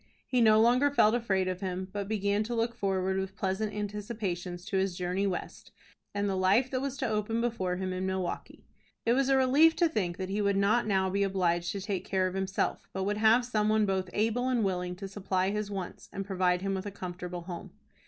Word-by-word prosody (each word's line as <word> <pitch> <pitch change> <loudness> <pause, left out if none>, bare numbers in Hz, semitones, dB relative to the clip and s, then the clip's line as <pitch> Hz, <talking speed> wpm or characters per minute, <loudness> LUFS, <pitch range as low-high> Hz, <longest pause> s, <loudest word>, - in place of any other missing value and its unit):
He 250 -2 +1
no 215 -1 +6
longer 250 +5 +4
felt 220 -6 +4
afraid 195 -6 +1
of 185 0 -3
him, 185 -1 -3
but 200 -1 -3
began 205 -1 0
to 240 +2 -3
look 230 +1 0
forward 190 -3 0
with 190 0 -4
pleasant 195 +3 -1
anticipations 205 -4 -4
to 200 - -1
his 190 -2 0
journey 180 +2 0
West, 185 - -5 0.5
and 205 0 0
the 195 - 0
life 195 +8 +3
that 255 -1 -1
was 275 0 -3
to 265 - -1
open 220 +1 -1
before 225 -7 -1
him 185 0 -3
in 185 +1 -2
Milwaukie. 190 -1 -4 0.4
It 230 - +4
was 270 +1 +2
a 270 - +5
relief 285 +5 +5
to 345 - +3
think 185 - -2
that 185 0 -4
he 205 +1 0
would 200 -1 +2
not 215 +4 +3
now 190 -2 +1
be 200 +1 0
obliged 175 -3 +1
to 200 - -4
take 190 -2 -3
care 190 -1 0
of 185 - -2
himself, 190 0 -2
but 190 - -2
would 205 +2 -1
have 225 +3 +5
some 215 -3 +1
one 215 0 +3
both 190 -2 -1
able 230 +5 0
and 245 -3 +1
willing 180 -2 -1
to 195 +2 -7
supply 190 -1 -1
his 210 0 -2
wants, 195 -3 -6
and 195 0 -4
provide 185 -2 +1
him 195 0 0
with 190 +1 -3
a - - -4
comfortable 180 -2 -6
home. 170 0 -7
195 Hz, 225 wpm, -30 LUFS, 185-220 Hz, 0.5 s, no